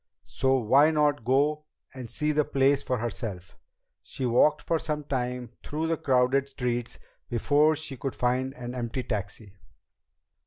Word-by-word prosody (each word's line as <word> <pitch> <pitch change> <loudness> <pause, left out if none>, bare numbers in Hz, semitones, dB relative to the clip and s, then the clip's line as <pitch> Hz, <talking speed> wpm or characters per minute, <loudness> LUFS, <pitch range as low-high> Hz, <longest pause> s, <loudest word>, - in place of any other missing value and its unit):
So 130 0 +1
why 135 +6 +5
not 150 -4 +1
go 145 +5 +1 0.3
and 130 -3 -8
see 150 +5 -1
the 150 0 +2
place 140 0 +2
for 130 -2 -1
herself? 110 -6 -5 0.5
She 130 - -5
walked 135 +5 +3
for 165 - 0
some 150 -2 -3
time 125 -3 -3
through 155 +2 -3
the 165 0 0
crowded 135 -2 +2
streets 120 -3 -3 0.3
before 145 +6 +3
she 145 -3 -6
could 135 +2 -4
find 125 +2 0
an 120 0 -6
empty 125 +1 -3
taxi. 105 -2 -5
130 Hz, 150 wpm, -27 LUFS, 120-150 Hz, 0.5 s, why